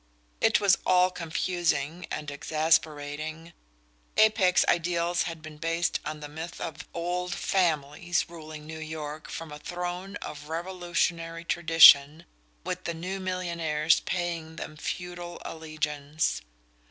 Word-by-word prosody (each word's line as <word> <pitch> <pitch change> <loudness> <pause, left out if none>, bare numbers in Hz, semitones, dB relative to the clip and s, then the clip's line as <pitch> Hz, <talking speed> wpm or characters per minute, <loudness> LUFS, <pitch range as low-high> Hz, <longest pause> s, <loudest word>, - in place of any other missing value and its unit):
It - - +5
was 195 -1 +4
all 185 0 +4
confusing 170 -2 -1
and 150 -1 -4
exasperating. 155 +1 0 0.6
Apex 215 -4 +5
ideals 170 0 +1
had 165 -2 -8
been 155 -1 -9
based 165 +2 0
on 155 0 -5
the 150 - -6
myth 160 +3 -7
of 165 - -6
"old 175 +1 -2
families" 170 -1 0
ruling 155 -2 -9
New 160 0 -7
York 155 -1 -6
from 165 -2 -6
a 150 - -8
throne 180 +4 -5
of 150 -5 -7
Revolutionary 170 -1 -2
tradition, 165 -2 +7 0.4
with - - -4
the 170 - -2
new 185 +4 -4
millionaires 170 -4 +1
paying 170 -3 -3
them 155 - -7
feudal 175 +2 -5
allegiance. 155 -1 -2
165 Hz, 120 wpm, -28 LUFS, 155-175 Hz, 0.6 s, tradition